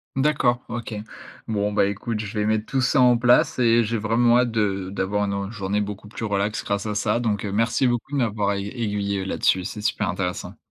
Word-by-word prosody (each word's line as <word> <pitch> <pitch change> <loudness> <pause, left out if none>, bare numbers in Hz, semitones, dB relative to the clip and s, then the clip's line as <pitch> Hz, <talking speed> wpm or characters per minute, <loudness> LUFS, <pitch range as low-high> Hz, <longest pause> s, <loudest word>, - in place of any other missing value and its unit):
D'accord, 135 -3 +2
OK. 115 -1 -5 0.5
Bon, 105 -1 0
bah, 100 - +3
écoute, 105 +3 -3
je 105 0 -4
vais 105 - +1
mettre 110 0 +1
tout 135 +2 -1
ça 135 +2 +2
en 125 -1 +6
place 125 +1 +4
et 120 -1 +4
j'ai 115 +1 -1
vraiment 120 +3 +3
hâte 125 -1 +2
de 100 -4 -1
d'avoir 100 +1 -1
une, 100 - -2 0.2
heu, - - -8
journée 100 -2 -2
beaucoup 105 0 -6
plus 110 +1 -6
relax 100 0 -1
grâce 100 +1 -2
à 105 - -2
ça. 105 +3 +1
Donc, 110 -4 -1
heu, 100 - -3
merci 115 +5 +1
beaucoup 120 +2 -2
de - - +1
m'avoir 105 -5 0
aigu 100 0 -3
aiguillé, 105 -4 -2
heu, 95 - -4
là-dessus, 95 -1 +1
c'est 105 +2 -6
super - - 0
intéressant. 90 -2 -4
105 Hz, 225 wpm, -23 LUFS, 100-120 Hz, 0.5 s, en